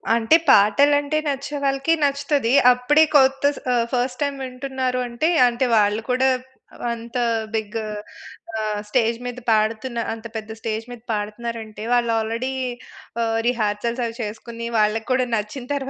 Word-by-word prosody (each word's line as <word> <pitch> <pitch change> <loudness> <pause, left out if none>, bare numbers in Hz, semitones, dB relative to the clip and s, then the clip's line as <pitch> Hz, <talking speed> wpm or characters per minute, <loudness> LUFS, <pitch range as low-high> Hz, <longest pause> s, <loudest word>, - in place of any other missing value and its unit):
అంటే, 230 +7 +4
పాటలు 215 +9 +6
అంటే 290 +2 -2
నచ్చే 280 +1 -3
వాళ్ళకి 275 +3 +1
నచ్చుతది. 280 -3 +1 0.2
అప్పుడే 290 +6 +4
కొత్త 270 -1 +4
స్ - - -8
ఆహ్, 235 -1 +2
ఫస్ట్ 250 0 -1
టైమ్ 280 -1 -1
వింటున్నారు 255 0 -3
అంటే, 240 +7 0 0.2
అంటే, 240 +2 0
వాళ్ళు 210 +1 +2
కూడా 255 +1 +3 0.6
అంత 235 +1 -6 0.4
బిగ్ 220 0 -3 0.8
ఆహ్, 215 -1 -2
స్టేజ్ 230 0 +1
మీద 245 0 -5
పాడుతున్న 225 +3 0
అంత 225 0 -10
పెద్ద 220 0 -7
స్టేజ్ 220 0 -3
మీద 240 -2 -9
పాడుతున్నారంటే, 215 0 -5
వాళ్ళు 240 -1 +2
ఆల్రెడీ 230 +4 -2 0.7
ఆహ్, 225 0 0
రిహార్సల్స్ 235 +1 -1
అవి 230 -1 -5
చేసుకొని 230 +2 -6
వాళ్ళకి 215 +1 +1
కూడా 255 0 +2
నచ్చిన 215 +5 -4
తర్వాతనే 270 -1 -3
235 Hz, 145 wpm, -22 LUFS, 220-265 Hz, 0.8 s, పాటలు